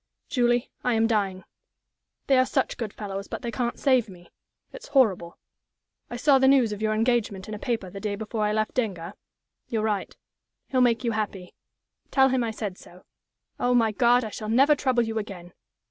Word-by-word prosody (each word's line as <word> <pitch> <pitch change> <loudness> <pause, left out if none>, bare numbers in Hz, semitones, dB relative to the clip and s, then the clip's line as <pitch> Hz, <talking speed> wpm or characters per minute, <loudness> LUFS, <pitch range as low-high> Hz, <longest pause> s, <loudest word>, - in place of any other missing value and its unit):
"Julie, 240 -2 +1
I 245 -2 +1
am 225 0 +3
dying. 200 -4 0 0.8
They 270 -2 +4
are 255 - +4
such 265 - 0
good 225 -4 -4
fellows, 200 -2 -6
but - - -6
they 235 - -3
can't 240 0 -2
save 255 -5 +2
me. 175 -2 -15 0.4
It's - - -10
horrible. 195 - +2 0.7
"I - - -6
saw 270 +2 +4
the 265 - +4
news 265 -5 +4
of 210 0 -5
your 215 0 +1
engagement 220 -4 0
in 215 - -6
a 210 - -6
paper 225 -4 -2
the 195 - -7
day 205 0 -3
before 215 +1 -3
I 210 - +1
left 215 0 -1
Denga. 195 -8 -3 0.6
You're 220 -2 -1
right. 210 -3 -2 0.5
He'll 260 -2 +2
make 240 -1 +3
you 235 - 0
happy. 205 -4 -4 0.6
Tell 265 -1 +4
him 255 -1 +1
I 230 - -1
said 210 -4 -5
so. 180 +1 -16 0.5
Oh, 245 0 +2
my 225 -2 +3
God, 245 +3 +3
I 220 - -4
shall 215 +1 -6
never 270 +6 +5
trouble 255 -4 +1
you 225 -1 -2
again! 185 -4 -8
225 Hz, 195 wpm, -25 LUFS, 205-245 Hz, 0.8 s, never